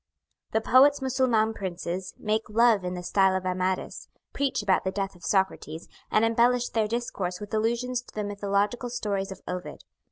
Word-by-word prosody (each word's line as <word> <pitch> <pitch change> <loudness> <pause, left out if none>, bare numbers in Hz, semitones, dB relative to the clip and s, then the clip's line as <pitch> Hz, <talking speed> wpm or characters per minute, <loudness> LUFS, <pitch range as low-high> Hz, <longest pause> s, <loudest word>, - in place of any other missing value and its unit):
The 220 - +2
poet's 275 +5 +5
Mussulman 255 -5 +1
princes 185 -1 -5
make 215 +1 -1
love 225 -2 +4
in 180 0 -3
the 180 - -6
style 190 +1 +3
of 185 0 -2
Amadis, 185 0 -2 0.2
preach 275 -6 -1
about 190 -2 +2
the 190 - 0
death 195 -1 -3
of 175 - -18
Socrates, 190 -5 -1 0.2
and 215 - +3
embellish 240 +2 +2
their 220 -2 0
discourse 205 -6 -3
with 210 +1 -9
allusions 235 +3 0
to - - -19
the 210 - -2
mythological 205 +4 -1
stories 200 -5 -2
of 190 - -9
Ovid. 180 0 -6
210 Hz, 170 wpm, -27 LUFS, 190-235 Hz, 0.2 s, poet's